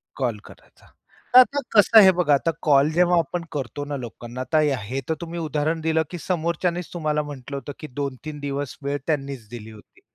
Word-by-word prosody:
Call 120 -5 -2
करायचा. - - -18 0.5
तर, - - +12
आता 275 +3 +5 0.2
कसं 215 +2 +6
आहे 190 -3 +8
बघा, 160 -5 +3
आता 145 -1 +3
जेव्हा 175 +1 +3
आपण 170 +1 -1
करतो 145 0 -4
ना 145 -1 -4
लोकांना, 120 0 -7
तर 155 - +5 0.3
हे 135 +1 -2
तर, - - +2
तुम्ही 170 0 -5
उदाहरण 155 +1 -1
दिलं, 160 0 +1
की 175 - -6
समोरच्यांनीच, 170 0 -2
तुम्हाला 155 -3 0
म्हटलं 140 0 -7
होतं, 140 - -7
की 155 - -7
2-3 140 +2 -5
दिवस, 140 -1 -4
वेळ 140 +1 -1
त्यांनीच 140 -6 -3
दिली 110 -2 -9
होती. 105 -1 -17
150 Hz, 185 wpm, -23 LUFS, 135-170 Hz, 0.5 s, तर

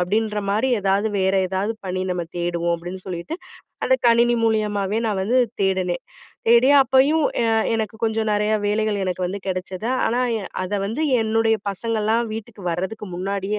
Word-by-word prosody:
அப்படின்ற 210 +4 0
மாரி 220 +6 +1
ஏதாவது 200 +2 +1
வேற 190 +1 +2
ஏதாவது 195 +4 -1
பணி 185 0 -2
நம்ம 180 -1 -1 0.2
தேடுவோம்". 170 0 0
அப்படின்னு 175 +3 -7
சொல்லிட்டு, 180 - -5 0.5
அத - - +2 0.2
கணினி 235 +1 +4
மூலியமாவே 210 -2 0
நான் 205 -3 -1
வந்து 235 +7 +2 0.2
தேடுனேன். 185 -2 0 0.5
தேடி 235 +3 +6
அப்பயும் 270 +4 +3 0.2
எ - - +1 0.3
எனக்கு 220 0 -2
கொஞ்சம் 220 0 0
நிறைய 210 +1 +1
வேலைகள் 210 0 0
எனக்கு 185 0 -2
வந்து 190 +3 -4
கிடைச்சது. 185 +3 -3 0.2
ஆனா 240 +2 +1 0.2
எ - - -7 0.2
அத 185 - -5
வந்து 225 +10 -2 0.2
என்னுடைய 225 0 +2
பசங்கள்லாம் 225 +2 -1
வீட்டுக்கு 220 -2 -8
வரதுக்கு 190 +5 -4
முன்னாடியே 195 +3 -2
210 Hz, 155 wpm, -22 LUFS, 190-225 Hz, 0.5 s, தேடி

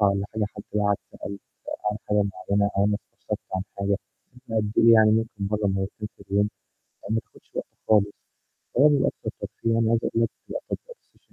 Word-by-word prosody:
والّا 100 -1 +3
حاجة 110 - +1
حتي 100 - -7
لو 105 - +2
قعد 100 -1 +4 0.2
سأل 100 0 -6 0.5
عمل 105 - -5
حاجة 105 -1 +4 0.3
معينة 100 0 +3
أو 100 - +5
أنا 105 0 +3 0.2
استشرته - - -4 0.2
عن 95 - 0 0.2
حاجة 100 0 +1 0.5
بقد 110 -2 0
إيه 115 0 +8
يعني، 110 -1 +7
ممكن 110 -2 0
مرة 105 -1 +1
مرتين 95 +2 -2
في 100 - -13
اليوم، 100 +1 +3 0.6
آآ، 100 - -7
ما 110 - +3
بتاخدش - - -20
وقت - - -2 0.2
خالص. 105 -2 +6 0.7
هو 145 +3 +8
بيبقى 145 -2 +4 0.2
الأكتر - - 0
ترفيه، 115 0 -1
يعني 115 -1 +3
عايز 115 0 +4
أقول 115 - +2
لك - - +2 0.2
في - - -12
الأخر - - -4
التليفون - - -9
105 Hz, 200 wpm, -26 LUFS, 100-115 Hz, 0.7 s, إيه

